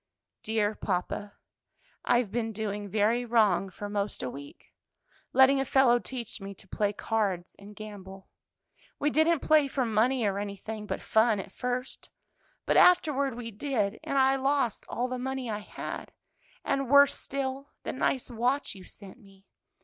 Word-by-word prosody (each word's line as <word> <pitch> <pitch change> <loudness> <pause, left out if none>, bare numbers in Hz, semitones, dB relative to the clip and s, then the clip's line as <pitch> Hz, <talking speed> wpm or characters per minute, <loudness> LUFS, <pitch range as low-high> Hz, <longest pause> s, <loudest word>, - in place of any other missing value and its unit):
"Dear 215 -1 0
papa, 205 +1 -3 0.7
I've 240 -4 +2
been 225 -1 -2
doing 205 -1 -4
very 220 +4 +2
wrong 215 -6 +2
for 205 +2 -7
'most 205 0 -2
a 125 - -3
week 140 +2 -12 0.6
letting 265 +1 +6
a - - +2
fellow 265 -2 +4
teach 235 -4 -6
me 195 0 -7
to 195 - -13
play 205 +2 0
cards 200 -4 -2
and 205 +1 -12
gamble; 195 -3 -10 0.7
we 295 +1 +1
didn't 315 +1 +3
play 305 -2 +4
for 265 -2 -1
money 230 +2 +2
or 200 -1 0
anything 205 +1 -6
but - - -4
fun 220 -1 +3
at - - -7
first, 250 +1 -3 0.6
but - - +2
afterward 285 -7 +4
we 235 -1 -6
did; 215 -3 -1
and 275 - -2
I 270 0 +4
lost 270 -4 0
all 245 - -1
the 255 0 -4
money 265 -2 -3
I 210 - -2
had, 210 - -7 0.5
and, 275 -2 0
worse 280 0 +7
still, 275 0 -4
the - - -3
nice 260 -1 -1
watch 245 +5 0
you 190 -2 -12
sent 200 +2 -12
me. 195 -3 -20
225 Hz, 160 wpm, -29 LUFS, 205-265 Hz, 0.7 s, worse